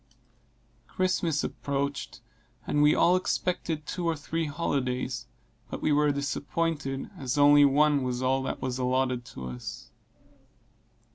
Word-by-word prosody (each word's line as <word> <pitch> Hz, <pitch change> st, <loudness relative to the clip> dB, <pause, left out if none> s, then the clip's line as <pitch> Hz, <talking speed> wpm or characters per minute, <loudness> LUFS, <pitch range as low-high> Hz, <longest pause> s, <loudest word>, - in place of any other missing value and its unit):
Christmas 180 Hz, -5 st, 0 dB
approached, 140 Hz, -2 st, -3 dB, 0.4 s
and 145 Hz, -, +1 dB
we 150 Hz, +1 st, +5 dB
all 180 Hz, -, +4 dB
expected 175 Hz, -4 st, -1 dB
two 180 Hz, +3 st, -4 dB
or 165 Hz, -, +1 dB
three 160 Hz, +2 st, -3 dB
holidays 130 Hz, -5 st, -2 dB, 0.4 s
but -, -, -5 dB
we 155 Hz, -, +1 dB
were 150 Hz, 0 st, +4 dB
disappointed, 145 Hz, 0 st, -2 dB
as 135 Hz, 0 st, -2 dB
only 145 Hz, 0 st, +7 dB
one 145 Hz, +1 st, +4 dB
was 125 Hz, -1 st, -2 dB
all 130 Hz, +1 st, +2 dB
that 130 Hz, -, -4 dB
was 130 Hz, -1 st, -2 dB
allotted 125 Hz, -1 st, 0 dB
to 65 Hz, -, -9 dB
us. 60 Hz, -1 st, -7 dB
145 Hz, 130 wpm, -28 LUFS, 130-150 Hz, 0.4 s, only